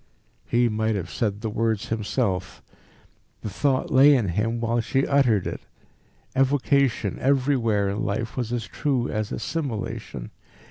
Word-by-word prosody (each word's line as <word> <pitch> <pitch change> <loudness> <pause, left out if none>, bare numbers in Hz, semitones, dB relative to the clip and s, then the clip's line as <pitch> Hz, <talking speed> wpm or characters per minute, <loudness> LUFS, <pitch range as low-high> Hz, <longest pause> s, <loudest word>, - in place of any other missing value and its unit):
He 120 0 +3
might 110 0 0
have 90 -3 -4
said 105 -2 -2
the 110 - -2
words 110 -1 -1
himself. 105 -4 -2 0.8
The 105 - -5
thought 130 +5 0
lay 140 +2 +7
in 115 -8 +1
him 115 +6 -1
while 115 0 0
she 135 +4 0
uttered 125 -9 +3
it. - - -4 0.7
Evocation 135 -5 +2
everywhere 125 -6 +2
in 105 +5 -2
life 110 +2 -2
was 120 -3 -3
as 120 -2 -2
true 130 -4 -1
as 110 -1 -2
assimilation. 115 - -4
115 Hz, 140 wpm, -24 LUFS, 105-130 Hz, 0.8 s, lay